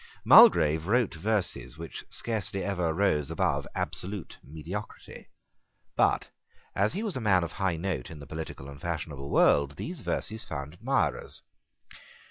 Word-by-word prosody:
Mulgrave 80 Hz, +2 st, +7 dB
wrote 120 Hz, -2 st, +2 dB
verses 85 Hz, -, -2 dB
which 85 Hz, 0 st, -7 dB
scarcely 105 Hz, -4 st, -2 dB
ever 90 Hz, -5 st, 0 dB
rose 80 Hz, -5 st, +1 dB
above -, -, 0 dB
absolute 95 Hz, 0 st, -4 dB
mediocrity: 80 Hz, +8 st, -8 dB, 0.7 s
but, -, -, +2 dB, 0.5 s
as 100 Hz, +5 st, +2 dB
he 200 Hz, +5 st, -3 dB
was 210 Hz, -5 st, -3 dB
a 130 Hz, -, -3 dB
man 95 Hz, -5 st, +3 dB
of 85 Hz, -, -4 dB
high 95 Hz, -4 st, -1 dB
note 85 Hz, -7 st, -3 dB
in 80 Hz, -, -9 dB
the 70 Hz, -, -10 dB
political 80 Hz, -2 st, -7 dB
and 70 Hz, +1 st, -11 dB
fashionable 75 Hz, -5 st, -4 dB
world, 70 Hz, 0 st, +4 dB
these 170 Hz, -, -6 dB
verses 110 Hz, 0 st, -3 dB
found 70 Hz, 0 st, -6 dB
admirers. 85 Hz, -, -1 dB
85 Hz, 140 wpm, -28 LUFS, 75-100 Hz, 0.7 s, Mulgrave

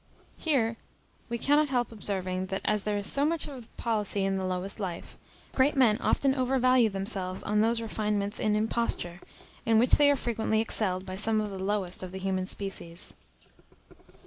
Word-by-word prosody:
Here 230 Hz, -8 st, +1 dB, 0.5 s
we 235 Hz, -, -1 dB
cannot 290 Hz, +4 st, +3 dB
help 245 Hz, -3 st, 0 dB
observing, 190 Hz, -3 st, -3 dB
that 195 Hz, 0 st, -4 dB
as 210 Hz, -1 st, +1 dB
there 210 Hz, 0 st, -1 dB
is 200 Hz, -, -2 dB
so 275 Hz, -, +5 dB
much 325 Hz, +2 st, +1 dB
of 260 Hz, -6 st, -11 dB
policy 210 Hz, -3 st, 0 dB
in 195 Hz, -, 0 dB
the 190 Hz, -1 st, -2 dB
lowest 185 Hz, +3 st, -2 dB
life, 180 Hz, -4 st, -5 dB, 0.4 s
great 275 Hz, +3 st, +3 dB
men 240 Hz, -5 st, +4 dB
often 270 Hz, +1 st, +2 dB
overvalue 255 Hz, -2 st, +3 dB
themselves 195 Hz, -2 st, -3 dB
on 210 Hz, 0 st, +1 dB
those 230 Hz, +1 st, +2 dB
refinements 210 Hz, -2 st, -2 dB
in 210 Hz, -1 st, +1 dB
imposture, 210 Hz, -5 st, 0 dB, 0.4 s
in 225 Hz, -1 st, +3 dB
which 240 Hz, +3 st, +3 dB
they 290 Hz, -1 st, +6 dB
are 285 Hz, -, +4 dB
frequently 225 Hz, -4 st, -1 dB
excelled 190 Hz, -4 st, -1 dB
by 185 Hz, 0 st, -6 dB
some 220 Hz, +2 st, +1 dB
of 210 Hz, -1 st, -2 dB
the 190 Hz, -1 st, -5 dB
lowest 195 Hz, -3 st, -1 dB
of 185 Hz, -1 st, -7 dB
the -, -, -5 dB
human 190 Hz, -1 st, -2 dB
species. 190 Hz, -3 st, -4 dB
210 Hz, 175 wpm, -28 LUFS, 190-235 Hz, 0.5 s, they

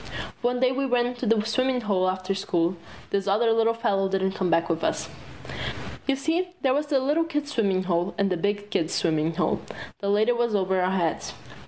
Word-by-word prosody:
One 245 Hz, +1 st, +1 dB
day 255 Hz, 0 st, +3 dB
when 270 Hz, +1 st, -1 dB
we -, -, -7 dB
ran 245 Hz, -1 st, +3 dB
away 245 Hz, -, -2 dB
to 240 Hz, -, -3 dB
the 215 Hz, -1 st, +3 dB
swimming 255 Hz, +3 st, +1 dB
hole 190 Hz, -4 st, +1 dB
after 185 Hz, +1 st, -2 dB
school, 180 Hz, -2 st, 0 dB, 0.4 s
this 200 Hz, 0 st, 0 dB
other 220 Hz, +4 st, +3 dB
little 225 Hz, 0 st, +2 dB
fellow 200 Hz, -4 st, +1 dB
didn't 190 Hz, 0 st, +1 dB
come 190 Hz, -1 st, -1 dB
back 165 Hz, 0 st, +2 dB
with 165 Hz, -1 st, -1 dB
us. -, -, 0 dB, 1.0 s
You 275 Hz, -, +3 dB
see, 325 Hz, +6 st, 0 dB
there 265 Hz, -1 st, +3 dB
was 295 Hz, +2 st, 0 dB
the 280 Hz, -2 st, +2 dB
little 295 Hz, +5 st, +2 dB
kids' 295 Hz, -2 st, -3 dB
swimmin' 195 Hz, -7 st, +1 dB
hole 175 Hz, +1 st, 0 dB
and 195 Hz, -1 st, +1 dB
the 180 Hz, -, +1 dB
big 205 Hz, +3 st, -2 dB
kids' 165 Hz, +1 st, 0 dB
swimmin' 160 Hz, 0 st, +1 dB
hole. -, -, 0 dB, 0.4 s
The 200 Hz, -, -2 dB
latter 215 Hz, +4 st, +3 dB
was 235 Hz, -2 st, 0 dB
over 190 Hz, -1 st, +1 dB
our 180 Hz, -, +2 dB
heads. 170 Hz, -3 st, -1 dB
205 Hz, 215 wpm, -25 LUFS, 185-250 Hz, 1.0 s, day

